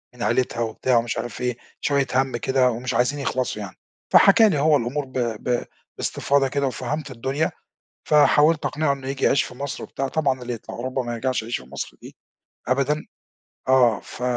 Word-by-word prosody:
من 120 - -5
عيلتها 125 -2 0
وبتاع 115 +2 +1
ومش 115 0 -1
عارف 120 0 -5
إيه، 125 -1 -1 0.2
شوية 140 -2 +1
هَم 130 -2 +1
كده 130 +1 +2
ومش 120 +2 -3
عايزين 140 +4 +1
يخلَصوا 130 -5 -2
يعني، 100 -3 -8 0.4
فحكى 215 +2 +7
لي 150 -6 0
هو 150 0 +4
الأمور 135 +4 -2
ب 130 0 -8
ب 120 +1 -1 0.3
باستفاضة 140 -1 +1
كده 140 0 0
وفهَمت 135 +3 -4
الدنيا 135 +6 -1 0.5
فحاولت 150 +1 +4
أقنِعه 150 -2 +1
إنه 135 -1 -8
ييجي 135 0 -1
يعيش 140 - +4
في 125 - -9
مصر 140 +1 -5
وبتاع، 135 0 -3
طبعًا 135 -3 0
اللي 125 0 -4
يطلع 115 - -8
أوروبا 130 +2 -2
ما 120 0 -4
يرجَعش 130 +1 -1
يعيش 115 +2 -3
في 65 - -16
مصر - - -6
دي - - -12 0.5
أبدًا. 140 +4 +1 0.6
آه، 125 -5 +4
ف 125 - -9
130 Hz, 185 wpm, -23 LUFS, 120-140 Hz, 0.6 s, فحكى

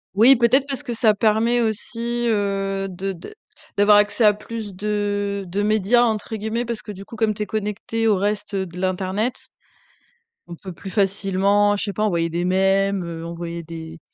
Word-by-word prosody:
Oui, 240 +7 +7
peut-être, 245 +3 +4
parce 275 -1 -3
que 245 -4 -4
ça 220 -1 +3
permet 225 +3 +2
aussi, 235 +2 -2
heu, 195 -2 -1
de 190 +1 -4
d 180 - -11 0.4
d'avoir 205 +1 +6
accès 210 +2 +3
à 210 - +6
plus 215 -1 -7
de 205 0 -2
de 195 +4 -2
«médias», 215 +3 +3
entre 220 -1 -1
guillemets. 220 +3 -2
Parce 230 -2 -4
que 210 - -8
du 195 0 -10
coup, - - -11
comme 220 -1 +1
tu 210 +1 -3
es - - -4
connecté 215 +1 -2
au 210 -3 +3
reste, 205 +1 -2
heu, 190 - -1
de 175 -1 -11
l'internet, 190 +5 -1 1.1
on 170 - -8
peut 185 +1 -9
plus 195 - -9
facilement, 200 +1 +2
je - - -3
sais 200 - -4
pas: 215 - -1
envoyer 170 -5 +1
des 170 +2 -2
mèmes, 195 0 +2
heu, 165 -1 -6
envoyer 170 0 -6
des 160 0 -9
205 Hz, 190 wpm, -22 LUFS, 190-220 Hz, 1.1 s, Oui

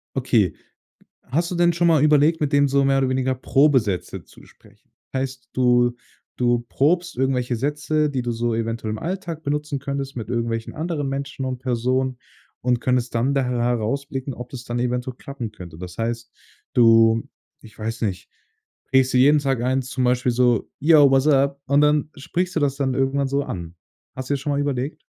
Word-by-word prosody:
Okay, 125 -8 +2 0.7
hast 165 +7 -1
du 180 - -3
denn 175 0 +3
schon 170 +1 +2
mal 160 -4 +4
überlegt, 155 +2 +4
mit 150 -1 0
dem 140 0 +4
so 140 0 +2
mehr 135 0 +3
oder 135 -1 +1
weniger 130 0 0
Probesätze 120 - +1
zu - - -18
sprechen? - - -23 0.2
Heißt, 130 -2 -4
du 120 -1 +3 0.4
du 120 -1 +2
probst 170 +2 +1
irgendwelche 125 -2 0
Sätze, 150 +3 0
die 130 -2 -1
du 120 0 -2
so 120 0 -1
eventuell 115 -1 -2
im 110 - -4
Alltag 175 -2 -4
benutzen 150 -1 -2
könntest 140 0 -4
mit 115 -3 -6
irgendwelchen 115 -1 -2
anderen 155 -3 -2
Menschen 135 0 -4
und 130 -1 -3
Personen 125 +1 -1 0.4
und 125 -1 +1
könntest 125 -1 0
dann 125 +4 +1
daher 125 -3 0
herausblicken, 130 +3 -2
ob 125 0 -8
das 125 -2 -8
dann 120 0 -4
eventuell 125 +1 -2
klappen 135 -6 -7
könnte. 85 -6 -11
Das 90 -1 -8
heißt, 115 0 -3 0.4
du 115 -1 +5 0.4
ich 110 -2 -16
weiß 115 +2 -4
nicht, 95 -4 -3 0.6
prägst 130 -1 +3
dir - - +4
jeden 145 +3 +6
Tag 135 -4 -1
ein 130 +1 +1
zum 130 0 -3
Beispiel 125 0 +2
so 120 -2 +2
„Yo, 150 -2 +6
what's 135 0 +3
up?" 140 -1 +3
und 140 +1 +3
dann 150 0 +2
sprichst 180 +6 -3
du - - +2
das 140 -2 +1
dann 135 -2 -1
irgendwann 135 +1 0
so 140 +1 0
an. 85 -8 -7 0.4
Hast 130 0 -6
du 145 - +2
dir - - -1
schon 145 +2 -3
mal 140 - 0
überlegt? 145 +1 -2
130 Hz, 190 wpm, -22 LUFS, 120-140 Hz, 0.7 s, jeden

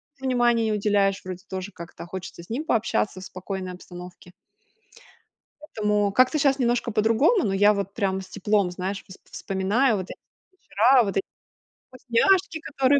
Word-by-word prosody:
мужу 265 - -10
внимание 240 -2 +2
не - - 0
уделяешь, 200 -1 +1
вроде 185 0 -7
тоже 190 +1 -5
как-то, 170 -1 -10
а - - -9
хочется 185 -1 -8
с - - -18
ним 275 +8 -3
пообщаться 215 - 0
в - - -8
спокойной 185 0 -6
обстановке. 180 0 -12 1.3
Поэтому, 210 -8 0
как-то 255 +6 +3
щас 275 -1 +2
немножко 240 -1 0
по-другому. 230 - +3
Но 195 - 0
я 205 +2 +5
вот 200 -1 -4
прям 190 -3 -1
с 190 - -11
теплом, 205 -2 0
знаешь, 190 +2 -4
воспо 190 - -15
вспоминаю 205 +6 +1
вот 185 - -4
эти - - -8 0.3
вечера, 250 - +3
вот 195 -2 -2
эти 195 - 0 0.6
вкусняшки, 315 +8 +1
которые. 275 -1 +2
210 Hz, 165 wpm, -24 LUFS, 190-245 Hz, 1.3 s, я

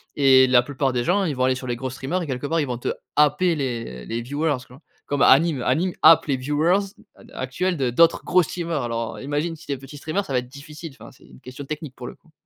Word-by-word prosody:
Et 130 -2 +6
la 125 -1 +5
plupart 135 +1 -2
des 125 -1 -1
gens 195 +3 +2
ils 155 -6 -1
vont 130 - +1
aller 130 0 +2
sur 130 0 -7
les 120 - -1
gros 130 +2 -4
streamers 135 +8 -3
et - - -6
quelque 130 +1 -3
part 165 +3 0
ils 145 - -1
vont 125 -1 -3
te 120 - -3 0.3
happer 150 +4 +3
les 115 - -4
les 115 - -4
viewers 145 +4 -1
tu 125 - -15
vois? 135 - -16 0.2
Comme 145 -1 -2
Anyme. 145 0 +5
Anyme 165 +10 +1
happe 160 +1 +7
les 135 -3 0
viewers 150 +8 +1 0.2
d - - -21 0.3
ac - - -5
actuels 175 +8 -2
de 130 -3 0
d'autres 165 +7 +3
gros 180 0 +3
streamer 170 0 -4
alors, 115 -2 -4
heu, - - -9
imagine 150 +4 -2
si 160 - -15
tu 140 - -1
es - - -4
petit 135 +3 -11
streamer 160 +7 -2
ça 140 - -6
va 125 - +3
être 125 - -8
difficile, 150 +3 -10
enfin 115 - -12
c'est - - -21
une - - -17
question 130 +2 -9
technique 150 -1 -6
pour 125 - -8
le - - -9
coup. 165 - -28
140 Hz, 275 wpm, -23 LUFS, 130-160 Hz, 0.3 s, happe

